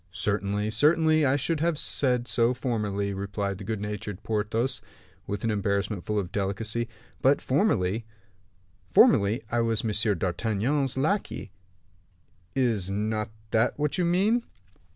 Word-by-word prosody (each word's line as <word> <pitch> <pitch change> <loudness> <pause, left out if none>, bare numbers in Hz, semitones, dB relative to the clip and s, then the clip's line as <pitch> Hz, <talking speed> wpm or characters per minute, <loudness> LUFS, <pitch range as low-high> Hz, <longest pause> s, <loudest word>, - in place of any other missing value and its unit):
"Certainly, 100 +3 -1
certainly, 155 +3 +4
I 130 - +3
should 155 +3 -1
have 165 0 +1
said 125 -4 0
so 120 +1 +2
formerly," 105 -5 -1
replied 100 0 -3
the - - -7
good 110 -2 -3
natured 105 -1 -5
Porthos, 115 +4 -1 0.5
with 100 0 -4
an 115 - +1
embarrassment 100 -1 -1
full 105 - 0
of 95 -4 -2
delicacy; 105 +4 -2 0.3
"but 135 +2 +4
formerly 115 - +1 0.4
" 95 -1 -36
"Formerly 105 +2 +5
I 120 0 +2
was 115 -1 0
M. 105 -2 +1
d'Artagnan's 115 - 0
lackey; 155 - -1 1.0
is 115 -8 +1
not 105 +2 -1 0.2
that 115 +2 +2
what 150 +4 0
you 180 - +2
mean?" 200 +8 +3
110 Hz, 135 wpm, -27 LUFS, 100-130 Hz, 1.0 s, Formerly